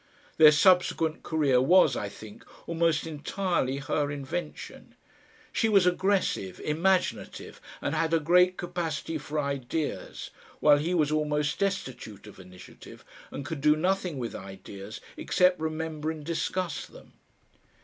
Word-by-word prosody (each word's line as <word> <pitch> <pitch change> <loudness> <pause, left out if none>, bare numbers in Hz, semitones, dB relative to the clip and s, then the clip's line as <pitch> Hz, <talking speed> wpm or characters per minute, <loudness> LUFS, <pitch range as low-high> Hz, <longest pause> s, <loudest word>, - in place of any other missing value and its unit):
Their 155 -1 +9
subsequent 165 0 +3
career 145 -6 +2
was, 180 +8 +5
I 100 - -3
think, 105 0 -12 0.2
almost 165 -1 +1
entirely 160 -2 -2
her 145 +1 -1
invention. 145 +4 -6 0.6
She 225 - +1
was 200 -4 +5
aggressive, 180 - 0
imaginative, 180 +5 -1 0.2
and - - -1
had 165 0 0
a 165 - +3
great 180 +4 +4
capacity 165 -2 -3
for 150 +1 -6
ideas, 140 +1 -4 0.3
while 145 -1 +5
he 170 +5 -1
was 150 -3 +2
almost 150 -1 0
destitute 130 - -3
of 105 - -13
initiative, 90 0 -14 0.2
and 140 - -7
could 160 -2 -5
do 150 +1 +5
nothing 180 -1 -1
with 120 -3 -4
ideas 95 +2 -9 0.2
except 180 -1 +2
remember 155 -1 -3
and 155 -2 -6
discuss 170 +1 -2
them. - - -16
155 Hz, 130 wpm, -28 LUFS, 140-175 Hz, 0.6 s, Their